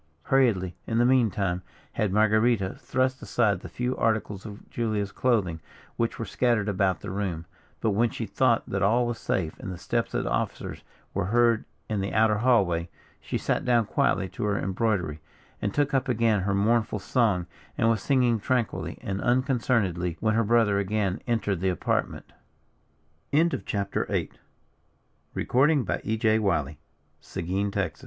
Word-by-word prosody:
Hurriedly, 105 -10 +2
in 115 - 0
the 120 - +4
meantime, 105 -8 +2 0.3
had 105 -3 -1
Marguerita 110 -1 +3
thrust 130 0 0
aside 110 -4 +1
the - - -9
few 125 +1 -2
articles 110 -2 -1
of 105 0 -11
Julia's 105 -4 -2
clothing 100 -11 +1 0.4
which 115 0 -1
were 115 - -4
scattered 115 -5 +1
about 95 -5 +1
the - - -6
room, 95 -5 -3 0.4
but 110 - +2
when 115 +4 +2
she 115 - -4
thought 115 +3 +1
that 100 - -2
all 115 +6 +3
was 120 -1 -3
safe, 80 -5 -2
and 110 -8 -6
the 90 - -6
steps 115 +6 -2
of - - 0
the - - -3
officers 60 - -3 0.3
were - - -1
heard 115 +2 +3 0.2
in 105 -2 -1
the 100 - -3
outer 110 0 +3
hall, 95 -9 +2 0.3
she - - -3
sat - - -1
down 120 -3 +3
quietly 95 - +1
to - - -6
her 100 -1 +1
embroidery, 95 -6 -1 0.4
and 100 - -1
took 145 +4 0
up 135 0 +1
again 115 -3 +2
her 100 +1 0
mournful 110 +2 +2
song, 105 -4 +1 0.3
and 115 - +2
was 115 -3 +2
singing 125 -1 +2
tranquilly 120 +1 -1
and 95 0 -3
unconcernedly, 115 - +1
when 110 -1 +1
her 115 +1 +2
brother 110 -2 +3
again 100 -1 -1
entered 105 -6 0
the 95 +1 +1
apartment. 90 - -2 1.0
CHAPTER 140 -10 0
IX. - - -2 1.0
SPANISH - - -3
HONOUR. 140 +1 +3
"Marguerita, 110 0 +1
come - - -3 0.3
forth. - - -10 0.6
The - - -1
Gene 95 +4 -1
110 Hz, 165 wpm, -26 LUFS, 95-120 Hz, 1.0 s, the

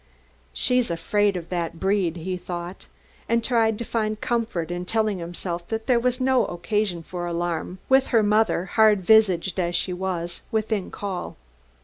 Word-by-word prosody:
"She's 250 -3 +1
afraid 200 +4 +1
of 170 -1 -7
that 170 -2 -3
'breed,'" 190 -4 +1
he 180 +2 -4
thought, 175 0 -7 0.4
and 230 0 +2
tried 225 -3 +2
to 235 - -5
find 215 -2 -1
comfort 225 -9 -1
in 175 0 -3
telling 215 0 0
himself 175 0 -5
that 225 0 -3
there 250 -3 +3
was 250 +1 0
no 260 -1 +3
occasion 175 0 -1
for 175 +1 -5
alarm, 175 +1 -2
with 265 0 +4
her 225 -3 +3
mother, 210 -3 +2
hard 210 +1 +4
visaged 190 -3 +4
as 175 -1 0
she 180 - 0
was, 180 -2 -3
within 220 -3 -1
call. 185 - -5
190 Hz, 160 wpm, -24 LUFS, 175-220 Hz, 0.4 s, with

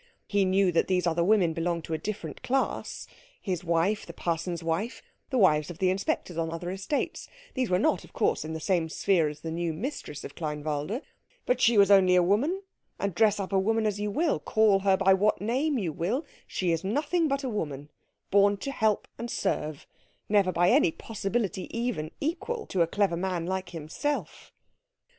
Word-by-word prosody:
He 200 -1 +2
knew 190 0 +3
that 170 - +2
these 180 -2 +1
other 170 0 +2
women 185 -4 +3
belonged 170 0 -1
to 165 - -5
a - - +1
different 170 -4 -5
class; 265 +1 -1 0.3
his 180 -4 -3
wife, 170 +5 +1
the - - -9
parson's 170 0 -2
wife, 170 +9 -2 0.3
the 260 - 0
wives 155 -8 +4
of 175 - -7
the 185 0 +2
inspectors 185 -2 -2
on 165 -1 -1
other 165 +2 -4
estates, 195 +10 -3 0.3
these 255 -3 -1
were 180 - +3
not, 185 - +1
of - - -15
course, - - 0
in 160 +1 -5
the 160 - -4
same 170 -2 0
sphere 170 -1 +2
as 150 0 -7
the 165 - -4
new 170 0 -2
mistress 165 - -5
of - - -8
Kleinwalde; 150 - -3 0.4
but - - +1
she 235 -2 +5
was 200 0 +6
only 185 -2 +6
a 180 - +5
woman, 280 - +1 0.3
and 200 -1 -2
dress 210 +3 +3
up 195 0 -4
a 195 - +4
woman 220 +3 +1
as 205 -1 0
you 210 0 -1
will, 310 +9 +1
call 215 -3 +3
her 195 -1 +3
by 195 0 +5
what 205 +3 +2
name 265 +8 0
you 180 -8 -2
will, 215 - -1 0.2
she 180 -2 -1
is 165 -1 -1
nothing 295 - +1
but 275 -1 -1
a - - -1
woman, 145 - -4 0.4
born 200 0 +5
to 275 +8 -4
help 220 -5 +1
and 235 - -4
serve, 150 - -2 0.4
never 200 -3 +3
by 175 +1 +3
any 170 - +4
possibility 200 -1 -3
even 230 -10 -2
equal 370 +10 -2
to 185 - -1
a 165 - +4
clever 200 0 +1
man 175 -1 -2
like 190 0 -3
himself. 175 - -4
190 Hz, 200 wpm, -28 LUFS, 170-220 Hz, 0.4 s, was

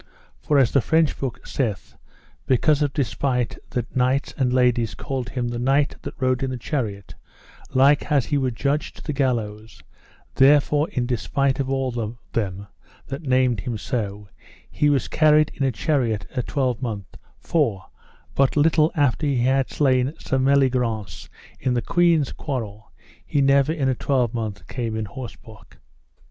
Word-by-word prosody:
For 150 - +1
as 130 -4 +4
the 140 - +3
French 160 +1 +1
book 135 -3 -5
saith, 115 -8 -3 0.5
because 140 +3 +3
of 145 -2 +1
despite 130 -3 -1
that 120 -2 -4
knights 130 +2 +1
and 130 -3 +1
ladies 125 -3 +2
called 130 -3 -4
him 125 -1 -2
the 120 0 -4
knight 135 +3 +2
that - - -7
rode 130 -1 +1
in 135 - -1
the 130 - -3
chariot 110 - -4 0.6
like 140 +3 +4
as 140 -4 +3
he 145 - 0
were 130 -1 +1
judged 140 +5 -2
to - - -12
the 150 - -3
gallows, 115 -5 -2 0.5
therefore 145 +3 +4
in 125 -2 -2
despite 130 +2 0
of 135 -1 -1
all 135 -1 0
them 110 -4 -4 0.4
that 135 +2 -6
named 130 -5 +2
him 115 +3 -4
so, 105 -3 -4 0.4
he 150 - +2
was 140 -4 +1
carried 155 -1 +4
in - - -10
a 135 -1 +2
chariot 115 -1 0
a 125 - +1
twelvemonth, 120 -7 -3 0.2
for, 115 - 0 0.5
but 135 +2 +2
little 155 +1 +4
after 145 0 +1
that 140 - +1
he 120 -2 +1
had 130 +1 +2
slain 130 0 +1
Sir 135 - -1
Meliagrance 125 - +1 0.3
in 125 -1 0
the 120 - +1
queen's 170 -3 +2
quarrel, 110 -7 -5 0.3
he 145 - -1
never 140 +1 +4
in 150 -5 -1
a 130 - +2
twelvemonth 115 -6 -1
came 115 -3 -3
on 110 - -2
horseback. 110 - -11
130 Hz, 160 wpm, -23 LUFS, 115-140 Hz, 0.6 s, as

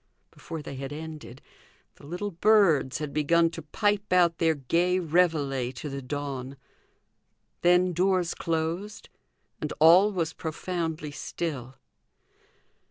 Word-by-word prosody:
Before 160 -2 -8
they 140 - -7
had 135 +1 -6
ended, 155 -4 -8 0.5
the 140 - -14
little 180 +6 -4
birds 170 -8 +3
had 150 -2 -5
begun 165 +2 +3
to 165 - -7
pipe 205 +6 -1
out 175 -2 +3
their 160 -1 +3
gay 170 +7 +1
reveillee 155 -7 +1
to 150 - -6
the 140 0 -5
dawn. 135 -1 -5 1.0
Then 180 +1 +4
doors 180 0 +1
closed, 165 +6 -3 0.5
and 150 - -4
all 175 +7 +7
was 165 -4 -2
profoundly 160 -2 -4
still. 140 -4 -5
165 Hz, 120 wpm, -27 LUFS, 145-180 Hz, 1.0 s, all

